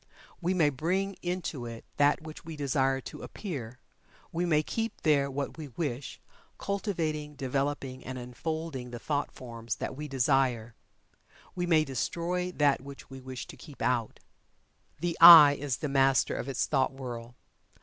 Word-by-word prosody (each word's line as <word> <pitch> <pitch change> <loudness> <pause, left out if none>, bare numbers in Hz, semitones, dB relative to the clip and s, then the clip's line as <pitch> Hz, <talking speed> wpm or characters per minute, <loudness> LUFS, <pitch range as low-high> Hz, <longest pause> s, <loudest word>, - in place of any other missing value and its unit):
We 180 +2 0
may 155 -5 +3
bring 185 +8 -1
into 175 -8 -3
it 115 -1 -9
that 145 +2 +3
which 155 0 -9
we 165 -1 -7
desire 135 -2 +1
to - - -9
appear; 130 - -6 0.5
we 175 +2 -1
may 155 -2 +3
keep 225 +7 -3
there 140 -3 +3
what 140 +3 -4
we 155 - -6
wish, 135 -1 -4 0.4
cultivating, 160 -7 -2
developing 135 -1 -2
and 130 0 -6
unfolding 130 +2 -5
the 120 - -6
thought 145 +4 -2
forms 115 -4 -6
that 110 - -5
we 150 +2 -6
desire; 130 -4 +1 0.8
we 175 -1 -2
may 160 -3 +4
destroy 175 +7 -2
that 145 -5 +2
which 140 0 -11
we 135 0 -9
wish 130 0 -7
to - - -11
keep 145 -4 -13
out. 120 -3 -1 0.8
The 175 -1 -1
"I" 165 -4 +12
is 140 -3 -2
the 150 - -3
master 135 -1 +3
of 135 - -4
its 135 - 0
thought 135 -3 +1
world. 120 -2 -7
140 Hz, 160 wpm, -29 LUFS, 130-160 Hz, 0.8 s, I